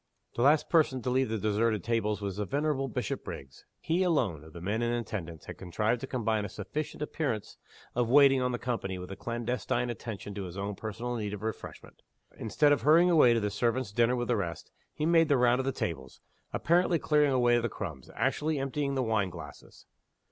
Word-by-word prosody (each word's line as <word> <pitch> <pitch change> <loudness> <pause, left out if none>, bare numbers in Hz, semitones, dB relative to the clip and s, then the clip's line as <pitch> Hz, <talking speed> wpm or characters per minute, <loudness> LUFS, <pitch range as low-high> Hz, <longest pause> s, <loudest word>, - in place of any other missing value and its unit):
The - - -1
last 145 +4 +4
person 140 -7 +2
to 125 - -1
leave 130 -1 +2
the 110 - -1
deserted 110 0 +1
tables 105 -3 0
was 100 -1 -4
the 105 - -1
venerable 140 +1 0
Bishopriggs. 100 - -5
He 170 +3 0
alone, 125 - +1
of 80 - -13
the 85 - -9
men 100 +6 -2
in 120 0 +1
attendance, 95 -9 -5
had - - -9
contrived 105 +6 -1
to 135 - -5
combine 110 -4 0
a 100 - -4
sufficient 145 +10 -5
appearance 135 -9 -3 0.4
of 120 -1 0
waiting 135 0 +6
on 125 0 +1
the 120 - -1
company 115 -7 -3
with 90 +1 -8
a - - -5
clandestine 120 +2 -2
attention 110 -3 -7
to 100 -1 -5
his 90 +1 -8
own 100 +1 -3
personal 115 +4 -4
need 105 -2 -3
of 105 - -10
refreshment. 110 0 -7 0.3
Instead 145 +7 +2
of 145 - +3
hurrying 170 +4 +5
away 125 -8 +6
to - - +2
the 105 -1 -1
servants' 120 +2 0
dinner 120 +3 +3
with 120 -1 -3
the 120 - +3
rest, 85 -5 -4 0.2
he 150 - -3
made 165 -1 +5
the 140 - +4
round 125 0 +4
of 130 - -1
the 135 - +1
tables, 65 - -5 0.3
apparently 175 +1 +2
clearing 150 -2 +3
away 120 -2 +4
the 120 0 -1
crumbs 80 -13 -7
actually, 155 0 0
emptying 140 +1 -2
the 130 - +1
wine 110 -4 +1
glasses. 80 -5 -11
120 Hz, 205 wpm, -30 LUFS, 105-135 Hz, 0.4 s, waiting